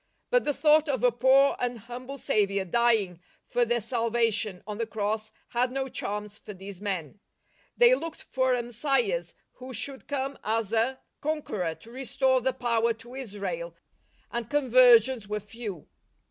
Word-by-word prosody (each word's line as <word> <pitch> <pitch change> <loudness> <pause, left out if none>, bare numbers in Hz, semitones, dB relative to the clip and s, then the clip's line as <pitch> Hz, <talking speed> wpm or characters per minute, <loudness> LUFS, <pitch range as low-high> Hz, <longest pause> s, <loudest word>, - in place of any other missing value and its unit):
But - - +3
the 290 - +1
thought 305 0 +4
of 260 -3 -1
a 245 - +5
poor 265 +4 +4
and 245 -1 -1
humble 250 +5 -8
Saviour 200 -5 +1
dying 205 -4 +2 0.2
for 245 - +1
their 240 +1 +1
salvation 230 -4 0
on 210 +1 -6
the 230 - -1
Cross 215 0 -2 0.2
had 245 +1 +1
no 270 0 -2
charms 210 -3 -4
for 210 - -10
these 195 0 -9
men. 195 -3 -4 0.6
They 485 0 +7
looked 330 -9 -3
for 260 -1 +1
a 240 - -1
Messias 270 - -1 0.2
who 255 0 -7
should 265 +4 -4
come 275 -1 -3
as 220 0 -1
a 235 +4 +1 0.2
conqueror 215 - -2
to 225 +9 -15
restore 260 0 +1
the 260 +2 +1
power 235 -2 +1
to 230 +2 -14
Israel, 265 - -5 0.6
and 235 -2 -4
conversions 255 -4 +5
were 210 +1 -2
few. 210 -4 -8
240 Hz, 160 wpm, -28 LUFS, 210-265 Hz, 0.6 s, They